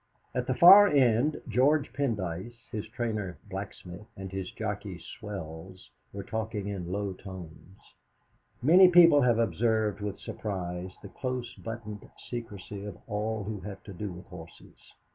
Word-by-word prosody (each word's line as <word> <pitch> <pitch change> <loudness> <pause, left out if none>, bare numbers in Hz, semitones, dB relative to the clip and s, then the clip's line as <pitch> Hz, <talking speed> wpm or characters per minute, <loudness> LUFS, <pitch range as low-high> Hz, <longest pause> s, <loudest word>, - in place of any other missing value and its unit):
At 125 -1 -2
the 130 - +1
far 195 +6 +10
end 135 - +3
George 135 +6 +2
Pendyce, 110 -6 -2 0.2
his 105 0 -4
trainer 110 -5 -3
Blacksmith, 95 0 -8
and 95 -1 -7
his 95 -1 -4
jockey 105 -3 -4
Swells, 95 - -9 0.2
were 100 0 -6
talking 110 -1 -3
in 90 -3 -5
low 100 0 -2
tones. 95 -1 -11 0.9
Many 180 +7 +8
people 170 -5 +7
have 120 -3 +4
observed 110 -2 +1
with 100 -1 -3
surprise 90 -3 -5
the 100 - -8
close 125 +1 -4
buttoned 110 -2 -8
secrecy 105 -4 -7
of 100 -4 -7
all 110 0 -2
who 105 +1 -4
have 100 +1 -8
to 100 - -9
do 100 +2 -5
with 90 +1 -10
horses. 85 -3 -14
105 Hz, 145 wpm, -29 LUFS, 95-120 Hz, 0.9 s, far